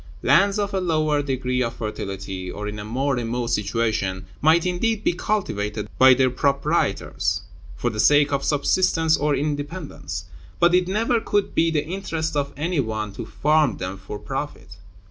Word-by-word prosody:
Lands 195 Hz, -, +4 dB
of 205 Hz, -1 st, -1 dB
a 190 Hz, -, 0 dB
lower 155 Hz, -4 st, +1 dB
degree 130 Hz, -2 st, -1 dB
of 115 Hz, -2 st, -1 dB
fertility 95 Hz, -3 st, -5 dB
or 105 Hz, +2 st, -5 dB
in 105 Hz, 0 st, -5 dB
a -, -, -5 dB
more 130 Hz, +6 st, -1 dB
remote 120 Hz, 0 st, -2 dB
situation 105 Hz, -3 st, -1 dB, 0.2 s
might 160 Hz, +3 st, +4 dB
indeed 205 Hz, +5 st, 0 dB
be -, -, +2 dB
cultivated 105 Hz, -, -2 dB
by 130 Hz, -1 st, +8 dB
their 130 Hz, 0 st, +3 dB
proprietors, 140 Hz, -4 st, 0 dB, 0.3 s
for 120 Hz, -, -1 dB
the 110 Hz, -, -6 dB
sake 145 Hz, +2 st, +5 dB
of 140 Hz, 0 st, 0 dB
subsistence 160 Hz, +3 st, +2 dB
or 145 Hz, 0 st, +1 dB
independence; 145 Hz, -, -4 dB, 0.3 s
but 170 Hz, +1 st, +4 dB
it 180 Hz, 0 st, +3 dB
never 225 Hz, +5 st, +1 dB
could 205 Hz, -2 st, -1 dB
be 165 Hz, 0 st, +3 dB
the 150 Hz, -2 st, 0 dB
interest 165 Hz, -3 st, -3 dB
of 140 Hz, -1 st, 0 dB
any 165 Hz, +2 st, -1 dB
one 110 Hz, -4 st, -2 dB
to -, -, -7 dB
farm 150 Hz, -6 st, +2 dB
them 95 Hz, +1 st, -4 dB
for 100 Hz, +2 st, -8 dB
profit. 135 Hz, -7 st, -6 dB
140 Hz, 165 wpm, -23 LUFS, 110-165 Hz, 0.3 s, by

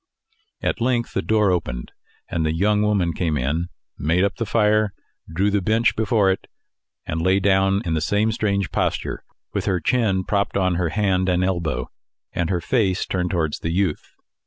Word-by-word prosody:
At -, -, -1 dB
length 120 Hz, -1 st, 0 dB
the -, -, 0 dB
door 105 Hz, -3 st, +2 dB
opened, -, -, -3 dB, 0.4 s
and 85 Hz, -, -1 dB
the 80 Hz, 0 st, 0 dB
young 105 Hz, +4 st, +2 dB
woman 100 Hz, -5 st, +1 dB
came 80 Hz, -3 st, -1 dB
in, 75 Hz, +7 st, -1 dB, 0.3 s
made 85 Hz, +5 st, +2 dB
up 100 Hz, 0 st, 0 dB
the 115 Hz, -, -2 dB
fire, 105 Hz, -2 st, +2 dB, 0.4 s
drew 95 Hz, +5 st, +1 dB
the 100 Hz, 0 st, +1 dB
bench 110 Hz, +4 st, +2 dB
before 110 Hz, -3 st, +2 dB
it, 95 Hz, -, -4 dB, 0.6 s
and 80 Hz, +1 st, -2 dB
lay 95 Hz, +3 st, +3 dB
down 95 Hz, 0 st, +2 dB
in 85 Hz, -, -1 dB
the 80 Hz, -, 0 dB
same 105 Hz, +6 st, +1 dB
strange 100 Hz, -4 st, -1 dB
posture, -, -, -1 dB, 0.3 s
with -, -, -2 dB
her 95 Hz, -2 st, +1 dB
chin 105 Hz, -7 st, +1 dB
propped 100 Hz, +1 st, 0 dB
on 95 Hz, -2 st, +2 dB
her 85 Hz, -1 st, 0 dB
hand 95 Hz, -1 st, +1 dB
and 90 Hz, 0 st, +2 dB
elbow, 85 Hz, -5 st, -1 dB, 0.4 s
and 85 Hz, -2 st, -1 dB
her 90 Hz, -2 st, 0 dB
face 95 Hz, -2 st, +1 dB
turned 90 Hz, -1 st, -1 dB
towards 80 Hz, -4 st, -1 dB
the 80 Hz, -, -3 dB
youth. 90 Hz, -3 st, -1 dB
95 Hz, 180 wpm, -22 LUFS, 85-105 Hz, 0.6 s, lay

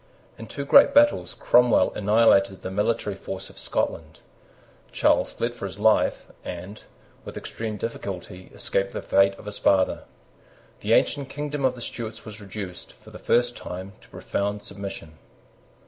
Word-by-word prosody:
In 115 Hz, -, -10 dB
two 140 Hz, +4 st, -5 dB
great 280 Hz, -, +7 dB
battles 290 Hz, 0 st, +4 dB
Cromwell 120 Hz, -6 st, +4 dB
annihilated 100 Hz, -2 st, +3 dB
the 95 Hz, -, -4 dB
military 105 Hz, +1 st, 0 dB
force 95 Hz, 0 st, -7 dB
of -, -, -14 dB
Scotland. -, -, -3 dB, 0.7 s
Charles -, -, +2 dB
fled 120 Hz, +1 st, -2 dB
for 110 Hz, -4 st, -5 dB
his 95 Hz, -, -9 dB
life, 110 Hz, +1 st, +2 dB, 0.2 s
and, 90 Hz, +4 st, -7 dB, 0.4 s
with -, -, -8 dB
extreme 110 Hz, -2 st, -5 dB
difficulty, 95 Hz, -4 st, -6 dB
escaped 95 Hz, 0 st, -2 dB
the -, -, -5 dB
fate 100 Hz, 0 st, +3 dB
of -, -, -14 dB
his 105 Hz, 0 st, -4 dB
father. 95 Hz, -1 st, +2 dB, 0.7 s
The -, -, +1 dB
ancient 140 Hz, -2 st, +2 dB
kingdom 145 Hz, 0 st, -4 dB
of 130 Hz, -1 st, +2 dB
the 120 Hz, -, -10 dB
Stuarts 115 Hz, -1 st, -6 dB
was 110 Hz, -1 st, -9 dB
reduced, 95 Hz, -2 st, -8 dB
for -, -, -17 dB
the -, -, -10 dB
first 120 Hz, 0 st, +2 dB
time, 95 Hz, +2 st, -7 dB
to -, -, -20 dB
profound 100 Hz, +1 st, -3 dB
submission. 100 Hz, -5 st, -8 dB
105 Hz, 155 wpm, -25 LUFS, 95-120 Hz, 0.7 s, great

